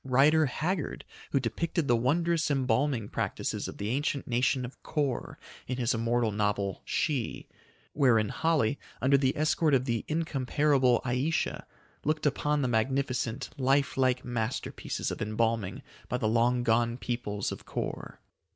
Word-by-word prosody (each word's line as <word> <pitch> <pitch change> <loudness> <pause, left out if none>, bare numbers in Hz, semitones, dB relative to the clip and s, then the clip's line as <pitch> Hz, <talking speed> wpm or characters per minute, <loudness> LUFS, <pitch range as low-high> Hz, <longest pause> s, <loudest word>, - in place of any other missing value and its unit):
Rider 145 +4 +4
Haggard, 160 +5 -2 0.2
who 140 - +2
depicted 145 +6 -1
the 120 - +4
wondrous, 160 +7 +1
embalming 130 -3 +1
practices - - -2
of - - -8
the 100 - -3
ancient 140 +2 -1
nation 125 +1 +1
of 125 - -11
Kor 145 -5 -2 0.3
in 125 - -2
his 125 0 +1
immortal 115 0 +1
novel, 100 -2 -1
"She," 140 -7 -1 0.5
wherein 115 -7 +3
Holly, 150 -6 +1 0.2
under 135 +2 +4
the 135 -1 +2
escort 155 -1 +3
of 130 -1 +1
the 115 -4 -1
incomparable 140 -4 +2
Ayesha, 130 +6 -1 0.4
looked 155 +1 0
upon 150 0 +1
the - - +1
magnificent, 125 0 -1
lifelike 130 -1 +2
masterpieces 120 0 -3
of - - -5
embalming 110 -2 -1 0.3
by 125 - 0
the 115 -3 0
long 120 +2 +2
gone 115 0 +2
peoples 120 -5 -3
of - - -8
Kor. - - -5
130 Hz, 140 wpm, -29 LUFS, 115-145 Hz, 0.5 s, Rider